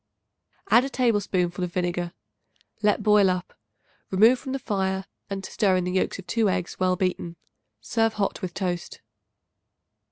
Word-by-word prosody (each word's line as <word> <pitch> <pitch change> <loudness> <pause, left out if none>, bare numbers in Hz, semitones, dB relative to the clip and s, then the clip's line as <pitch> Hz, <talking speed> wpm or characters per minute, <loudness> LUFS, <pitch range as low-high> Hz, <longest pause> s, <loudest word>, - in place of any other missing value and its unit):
Add 240 - +7
a 270 - -3
tablespoonful 205 -8 0
of 180 -1 -4
vinegar. 175 -1 -1 0.7
Let 210 0 +2
boil 210 -2 +5
up; 180 -1 -2 0.6
remove 225 +6 +5
from 265 - -6
the 270 - -1
fire 190 -5 -1 0.2
and 195 -1 -4
stir 195 -3 +1
in 185 - +1
the 180 - -2
yolks 185 - 0
of 190 - -10
2 225 -1 +1
eggs 185 -1 -2
well 185 -1 +2
beaten. 180 -2 -2 0.5
Serve 225 - +1
hot 205 +1 -1
with 180 -3 -5
toast. 180 -3 -3
190 Hz, 155 wpm, -25 LUFS, 180-210 Hz, 0.7 s, Add